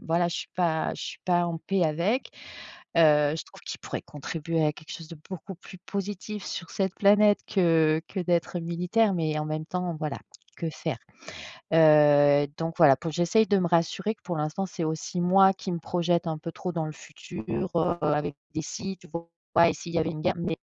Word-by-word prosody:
voilà, 170 +1 +1
je 170 - -3
suis - - -5
pas 165 -3 0
je - - -7
suis - - -6
pas 175 -1 +2
en 165 -1 -3
paix 185 +3 0
avec. 170 - 0 0.7
Heu, 150 -2 +5
je 160 - -5
trouve - - -17
qu'il - - -7
pourrait - - -6
contribuer 160 +2 -3
à 150 - +3
quelque 155 +1 -13
chose 165 - -8
de 165 -1 -10
beaucoup 185 0 -7
plus 185 +1 -13
positif 200 +2 -5
sur 180 - -5
cette 190 -2 -1
planète 205 +1 +5
que 160 -4 +3
que 195 - -5
d'être 175 0 0
militaire, 180 +5 +1
mais 155 -3 -1
en 150 - -2
même 155 0 -3
temps, 180 0 -3
voilà, 150 -2 -4 0.4
que 165 - -3
faire? 155 -3 -4 0.8
Heu, 145 -2 +6
donc 165 0 -3
voilà, 145 -5 +7
pour 165 +2 -5
que - - -9
j'essaye 180 +6 +3
de 200 -1 +3
me 180 -2 +1
rassurer 175 +5 +1
que, 210 - -39
pour 175 - -4
l'instant, 155 +6 -2
c'est 180 -2 -4
aussi 160 +3 -3
moi 190 +2 +6
qui 190 - -6
me 170 - -2
projette 175 +1 0
un 160 -1 -1
peu 165 +2 -7
trop 180 +1 -5
dans 165 -2 -2
le 155 - -5
futur 150 -7 -10 0.6
avec 150 -1 0 0.2
des 155 - -2
«si» 195 +5 -5
tu 180 - -17
vois? 170 +1 -7 0.4
«Et - - +1
s'il 170 +1 -8
y 165 - +3
avait 160 0 0
une 155 -2 -6
guerre». 180 +2 +1
Mais 170 -1 -2
170 Hz, 210 wpm, -27 LUFS, 155-180 Hz, 0.8 s, voilà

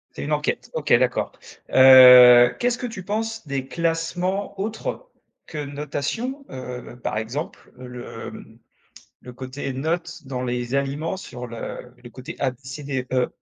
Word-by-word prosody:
C'est - - -5
une 150 - -4
enquête. 150 0 -2
OK, 150 -2 0
d'accord. 125 +1 +2 0.4
Heu, 125 -2 +9
qu'est-ce 245 0 +1
que 250 - -5
tu 195 -6 -8
penses 220 -2 -4
des 135 -1 -3
classements 170 +5 -2
autres 225 - -4 0.4
que 150 -2 -5
notation, 150 - -4
heu, 125 -1 -8
par 105 - -2
exemple 120 +8 -6
le, 125 -1 -8
mmh, - - -13 0.6
le 125 - -11
côté 130 +2 -6
note 165 +4 -3
dans 130 -1 -4
les 125 +1 -3
aliments 140 +6 -1
sur 125 -9 -8
le 120 +1 -8
le 120 - -11
côté 130 +1 -9
A, 135 - +1
B, 125 - -14
C, 135 +3 -8
D, 135 -3 -3
E? 125 -1 +1
140 Hz, 155 wpm, -23 LUFS, 125-170 Hz, 0.6 s, Heu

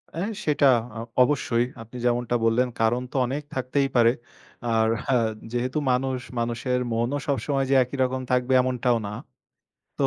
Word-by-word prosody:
অ্যা 170 +4 -1 0.2
সেটা 145 -2 +3 0.3
আ - - -4 0.2
অবশ্যই 125 -3 +1 0.2
আপনি 115 +3 -10
যেমনটা 120 0 +1
বললেন, 120 +3 +3
কারণ 115 +2 +2
তো - - -15
অনেক 140 +4 -3
থাকতেই 135 +2 0
পারে। 115 -1 +6 0.6
আর 110 0 +3 0.2
হা 135 - +2 0.4
যেহেতু 125 +3 -2
মানুষ, 130 +1 0 0.2
মানুষের 120 +2 -1
মনও 120 +5 0
সবসময় 135 0 0
যে - - +5
একই 125 +3 -7
রকম 130 0 -1
থাকবে, 125 +1 +2
এমনটাও 125 -1 +1
না। 100 - -6 0.9
তো - - +3
125 Hz, 155 wpm, -25 LUFS, 120-135 Hz, 0.9 s, পারে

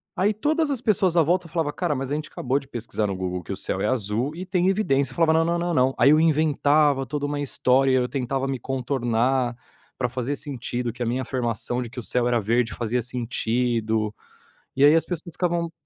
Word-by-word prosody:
Aí 205 +3 +2
todas 300 +7 0
as 270 - -1
pessoas 195 -7 +2
à - - +7
volta 175 +3 +1
falava: 160 -3 -2
"Cara, 175 -4 -1
mas 135 -1 -3
a - - +1
gente 155 0 -5
acabou 130 +2 -1
de 135 -1 -6
pesquisar 115 -4 -3
no 100 -2 -2
Google 90 -1 -3
que - - -8
o - - -3
céu - - -2
é - - +1
azul, 120 +3 -1
e 180 +3 -6
tem 185 -1 +1
evidência", 140 -10 +1
eu - - -12
falava: 165 -1 +3
"Não, 160 0 +3
não, 170 +1 0
não, 175 0 -1
não", 130 -2 +3
aí 135 +4 +6
eu 155 - +5
inventava 150 -3 +3
toda 145 +3 -3
uma 145 0 -2
história, 135 -1 +2
aí 130 -1 +3
eu - - -2
tentava 135 +1 -2
me 135 -1 -2
contornar, 125 -1 0 0.4
para 125 - 0
fazer 130 +3 -3
sentido 125 -4 -4
que 125 - -12
a - - +1
minha 120 +3 -1
afirmação 120 -1 -2
de 120 - -5
que 125 - -8
o - - -6
céu 120 +2 0
era 120 -1 +2
verde 115 +2 0
fazia 120 +1 -1
sentido. 115 -2 -1 0.6
E 135 - +2
aí 145 +2 +7
as 165 - +2
pessoas 175 0 -5
ficavam 170 -1 -1
135 Hz, 230 wpm, -24 LUFS, 120-160 Hz, 0.6 s, à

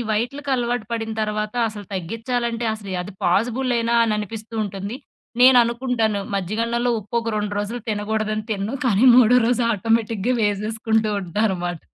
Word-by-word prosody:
వైటులకి 275 +6 -2
అలవాటు 240 -2 -1
పడిన 225 -1 -2
తర్వాత 215 +1 -2
అసలు 205 -1 -8
తగ్గిచ్చాలంటే 230 +5 -2
అసలు 205 -3 -9
అది 200 +2 -9
పాజిబులేనా? 235 +4 +1
అననిపిస్తూ 215 +1 -4
ఉంటుంది. 200 +4 -5 0.4
నేననుకుంటాను, 240 -4 +4
మజ్జిగన్నంలో 230 +6 -1
ఉప్పొక 230 +2 -2
2 210 0 -2
రోజులు 225 +4 -3
తినగూడదని 215 0 -1
తినును. 210 +4 -2
కానీ, 220 +2 +3
మూడో 250 0 +6
రోజు 245 0 +2
ఆటోమేటిక్‌గా 225 +2 0
వేసేసుకుంటూ 215 +1 0
ఉంటా 180 +4 -3
అనమాట. 175 -3 -3
220 Hz, 125 wpm, -22 LUFS, 210-235 Hz, 0.4 s, మూడో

